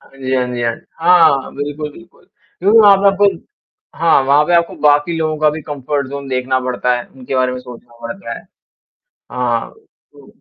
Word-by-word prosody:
हाँ -, -, -22 dB
जी, 130 Hz, 0 st, -2 dB
हाँ 125 Hz, -1 st, +1 dB
जी, 120 Hz, -, -3 dB
हाँ 115 Hz, -1 st, 0 dB
जी। -, -, -21 dB, 0.2 s
हाँ, 165 Hz, -5 st, +4 dB
बिल्कुल, 145 Hz, +1 st, -5 dB
बिल्कुल 175 Hz, +2 st, -18 dB, 0.3 s
क्योंकि 205 Hz, +5 st, +4 dB
वहाँ 205 Hz, -2 st, +7 dB
पे 200 Hz, +1 st, +1 dB
आपन 195 Hz, -2 st, +2 dB, 0.6 s
हाँ, 165 Hz, -4 st, +4 dB
वहाँ 145 Hz, +2 st, +4 dB
पे 175 Hz, -, +2 dB
आपको 170 Hz, +2 st, +1 dB
बाकी 150 Hz, +3 st, +3 dB
लोगों 155 Hz, -1 st, -1 dB
का 155 Hz, 0 st, +3 dB
भी 155 Hz, 0 st, -6 dB
कम्फ़र्ट 145 Hz, -1 st, -3 dB
ज़ोन 140 Hz, 0 st, -7 dB
देखना 130 Hz, 0 st, 0 dB
पड़ता 125 Hz, 0 st, -1 dB
है, 120 Hz, -, -6 dB
उनके 130 Hz, 0 st, -8 dB
बारे 130 Hz, -1 st, +1 dB
में 125 Hz, -, -5 dB
सोचना 120 Hz, -1 st, -14 dB
पड़ता 115 Hz, +1 st, -7 dB
है। -, -, -16 dB, 0.9 s
हाँ। 120 Hz, -2 st, -1 dB, 0.4 s
तो -, -, -17 dB
140 Hz, 195 wpm, -16 LUFS, 125-165 Hz, 0.9 s, वहाँ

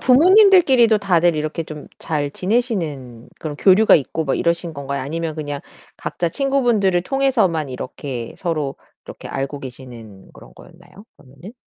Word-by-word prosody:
부모님들끼리도 290 Hz, -, +5 dB
다들 175 Hz, -4 st, +2 dB
이렇게 155 Hz, +2 st, -3 dB
좀 150 Hz, -1 st, -9 dB
잘 145 Hz, -3 st, -2 dB
지내시는 165 Hz, -, -3 dB
그런 150 Hz, -2 st, -6 dB
교류가 200 Hz, +5 st, +5 dB
있고 160 Hz, +2 st, -3 dB
막 135 Hz, -, -1 dB
이러신 170 Hz, 0 st, -1 dB
건가요? 140 Hz, -1 st, -4 dB
아니면 160 Hz, +2 st, -4 dB
그냥 145 Hz, -2 st, -5 dB, 0.4 s
각자 170 Hz, -, -3 dB
친구분들을 235 Hz, -, +1 dB
통해서만 225 Hz, -, 0 dB
이렇게 125 Hz, -1 st, -7 dB
서로 155 Hz, -6 st, -3 dB, 0.3 s
이렇게 -, -, -10 dB
알고 140 Hz, +1 st, -4 dB
계시는 120 Hz, -6 st, -11 dB
그런 -, -, -16 dB
거였나요 175 Hz, +3 st, -17 dB
그러면은? 140 Hz, -, -14 dB
165 Hz, 365 characters per minute, -20 LUFS, 140-210 Hz, 0.4 s, 부모님들끼리도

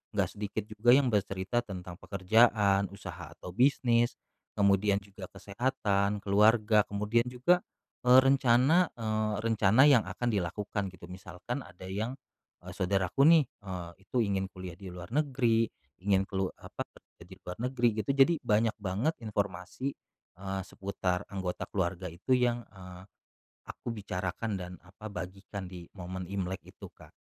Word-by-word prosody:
nggak -, -, +1 dB
sedikit 105 Hz, +1 st, -4 dB
juga 110 Hz, +3 st, +3 dB
yang 135 Hz, -4 st, +3 dB
bercerita 95 Hz, +2 st, 0 dB
tentang 90 Hz, -4 st, -7 dB
pekerjaan, 100 Hz, 0 st, +3 dB
usaha 100 Hz, -, -9 dB
atau 90 Hz, -, -9 dB
bisnis, 120 Hz, +1 st, +3 dB, 0.4 s
kemudian 100 Hz, 0 st, +3 dB
juga 95 Hz, -1 st, -10 dB
kesehatan, 100 Hz, -2 st, -1 dB
keluarga, 105 Hz, +1 st, +4 dB
kemudian 105 Hz, +3 st, +1 dB
juga, 130 Hz, +9 st, +3 dB, 0.4 s
eee, 125 Hz, +1 st, +8 dB
rencana, 135 Hz, +6 st, +4 dB
eee, 110 Hz, -2 st, -1 dB
rencana 110 Hz, +1 st, +4 dB
yang 125 Hz, -6 st, +6 dB
akan 120 Hz, +6 st, -2 dB
dilakukan 100 Hz, +1 st, -2 dB
gitu. 90 Hz, -1 st, -13 dB
Misalkan 95 Hz, +8 st, -6 dB
ada 95 Hz, +1 st, -12 dB
yang, 105 Hz, +6 st, -2 dB, 0.5 s
eee, 90 Hz, -, -8 dB
saudaraku 95 Hz, +6 st, +1 dB
nih, 160 Hz, -2 st, +7 dB
eee, 95 Hz, -8 st, -8 dB
itu 125 Hz, -, -4 dB
ingin 95 Hz, -2 st, -1 dB
kuliah 90 Hz, -2 st, -8 dB
di 95 Hz, +1 st, -10 dB
luar 90 Hz, +4 st, -9 dB
negeri, 125 Hz, -6 st, +2 dB, 0.4 s
ingin 95 Hz, -1 st, +3 dB
kelu 95 Hz, -2 st, -1 dB
apa, -, -, -6 dB, 0.4 s
pergi -, -, -12 dB
keluar 90 Hz, +4 st, -7 dB
negeri 120 Hz, -2 st, +2 dB, 0.2 s
gitu. 140 Hz, -, 0 dB
Jadi 140 Hz, +5 st, +6 dB
banyak 110 Hz, +1 st, +2 dB
banget 105 Hz, -, -1 dB
informasi, 100 Hz, +5 st, -3 dB, 0.5 s
eee, 95 Hz, 0 st, -3 dB
seputar 95 Hz, -1 st, -3 dB
anggota 95 Hz, -2 st, -4 dB
keluarga 90 Hz, -1 st, -2 dB
itu 90 Hz, +10 st, -6 dB
yang, 120 Hz, -1 st, +1 dB
eee, 90 Hz, -2 st, -11 dB, 0.6 s
aku -, -, -7 dB
bicarakan 100 Hz, +1 st, -3 dB
dan 90 Hz, 0 st, -6 dB
apa, 105 Hz, +3 st, -10 dB
bagikan 95 Hz, 0 st, -7 dB
di 90 Hz, -2 st, -10 dB
momen 90 Hz, +1 st, -5 dB
Imlek 95 Hz, -1 st, -3 dB
itu, -, -, -11 dB
Kak. -, -, -17 dB
100 Hz, 145 wpm, -30 LUFS, 95-120 Hz, 0.6 s, eee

